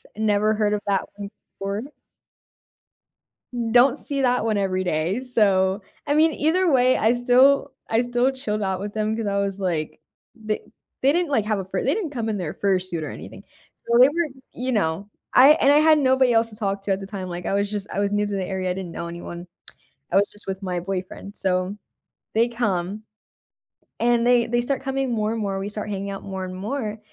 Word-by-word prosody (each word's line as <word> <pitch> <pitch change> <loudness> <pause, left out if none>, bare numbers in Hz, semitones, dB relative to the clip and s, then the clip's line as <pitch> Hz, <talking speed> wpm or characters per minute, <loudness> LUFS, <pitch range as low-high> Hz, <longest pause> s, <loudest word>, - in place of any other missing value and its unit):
never 215 0 +2
heard 210 -1 +1
of 210 - -1
that 195 -2 +1
one 200 -1 -6 0.3
before. 200 +1 -3 1.9
Don't 245 +3 +5
see 280 -2 -1
that 250 -2 +2
one 220 -2 0
every 185 -2 0
day, 175 +6 -1
so, 200 -6 +2 0.2
I 290 - +1
mean, 315 +1 +4
either 345 +5 +2
way, 255 -2 +4
I 220 +2 +3
still 260 +3 +4 0.2
I 225 +1 +3
still 245 +1 +1
chilled 215 -6 -3
out 190 -2 -1
with 205 0 -5
them, 215 0 -1
'cause 225 -1 -3
I 200 0 0
was 200 -1 -1
like 165 -5 -2 0.4
the 215 -2 -3 0.4
they 275 +2 +4
didn't, 345 -1 +1
like, 225 -7 +1
have 215 -1 0
a - - -3
fur 190 0 -3
they 275 - +2
didn't 385 -4 -2
come 235 -5 -3
in 215 -2 -1
their 175 -5 -4
fursuit 185 -4 -1
or - - -4
anything, - - -10 0.3
so, 235 - 0
they 255 - +9
were 335 +2 -1 0.3
you 255 +1 -2
know? 195 -1 -1 0.2
I 265 +3 +8
and 275 - +5
I 290 - +6
had 310 0 +5
nobody 260 -3 +3
else 225 0 +3
to 215 - -11
talk 200 -2 -2
to 195 - -2
at 190 - +1
the 195 - -7
time, 195 -2 -5
like, 175 0 -6
I - - -1
was 200 +1 0
just 205 -1 -4
I - - -3
was 200 0 0
new 205 0 +1
to 205 - -3
the 190 -1 -2
area, 185 -1 -2
I - - 0
didn't 185 -2 -6
know 170 - -5
anyone, 170 +1 -8 0.6
I - - +1
was 200 +1 +5
just 205 - -19
with 190 +1 -4
my 180 -2 -2
boyfriend, 190 +2 -6
so, 185 +1 -1 0.6
they 230 +2 +3
come, 210 -4 -2 1.0
and 235 0 +2
they 245 -1 +4
they 240 +1 0
start 270 +3 -1
coming 270 -1 -1
more 215 -1 0
and 225 - -3
more, 195 -2 -2
we 195 +1 -4
start 210 0 -5
hanging 200 0 -4
out 195 - -6
more 190 -1 -5
and 185 0 -7
more, 215 +2 -4
210 Hz, 220 wpm, -23 LUFS, 195-245 Hz, 1.9 s, they